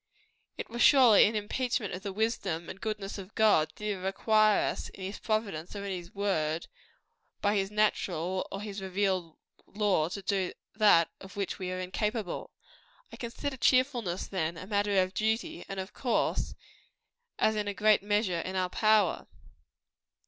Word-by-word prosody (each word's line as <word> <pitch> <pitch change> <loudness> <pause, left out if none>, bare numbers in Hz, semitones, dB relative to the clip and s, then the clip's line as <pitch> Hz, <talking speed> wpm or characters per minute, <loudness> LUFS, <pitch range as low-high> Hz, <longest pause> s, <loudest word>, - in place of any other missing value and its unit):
It - - -5
were 240 - -5
surely 245 -6 +7
an 220 - -2
impeachment 220 +1 -1
of 180 - -5
the 200 0 -4
wisdom 195 -6 -2
and 195 - -12
goodness 210 -2 -4
of 195 +2 -11
God, 210 -8 +4
did 210 - -8
he 210 - 0
require 210 +3 +2
us, - - -6
in 190 - -11
his 195 +2 -5
providence 210 -6 -2
or 200 0 -5
in 200 - -3
his 175 -1 -6
word 170 -6 -1 0.7
by 205 0 +1
his 195 -2 0
natural 190 -4 0
or 195 - -5
his 205 -1 -6
revealed 190 -3 -1 0.3
law 200 -6 +1
to 200 +2 -6
do 190 -2 -1 0.2
that 205 -7 +5
of 190 - -12
which 200 0 -3
we 185 -1 -3
are 185 - -3
incapable. 210 +1 -3 0.6
I - - -8
consider 265 +3 -5
cheerfulness, 245 -7 +2
then, 170 -3 -2
as - - -7
a - - -11
matter 205 -1 +2
of 185 +1 -6
duty; 225 +11 -1
and, 195 -1 -4
of 190 +1 -6
course, 250 -3 0 0.8
as 220 - +2
in 210 -1 -2
a 205 - -1
great 215 -1 +4
measure 205 -3 0
in 185 +3 -4
our 185 -1 0
power. 215 -2 +2
200 Hz, 170 wpm, -30 LUFS, 185-215 Hz, 0.8 s, surely